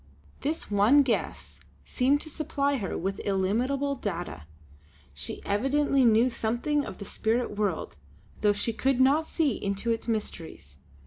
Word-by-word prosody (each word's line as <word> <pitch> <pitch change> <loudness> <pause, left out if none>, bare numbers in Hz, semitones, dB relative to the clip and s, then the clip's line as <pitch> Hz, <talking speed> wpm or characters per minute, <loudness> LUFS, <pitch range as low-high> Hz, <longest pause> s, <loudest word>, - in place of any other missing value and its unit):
This 305 -6 -3
one 215 +8 +5
guess 245 -4 -2 0.3
seemed 275 +3 +2
to 310 - -7
supply 285 -2 -1
her 200 -6 -3
with 195 +3 -3
illimitable 240 +9 0
data; 175 - -5 0.7
she 70 +1 -6
evidently 270 +6 +2
knew 230 +2 +5
something 245 +5 0
of - - -7
the 200 - -8
spirit 225 +2 -1
world, 205 - -2 0.4
though 210 - +4
she 205 +3 -1
could 260 +2 +1
not 285 +5 +4
see 295 -9 0
into 200 +4 -1
its 225 0 -2
mysteries. 165 - -4
230 Hz, 140 wpm, -27 LUFS, 200-275 Hz, 0.7 s, one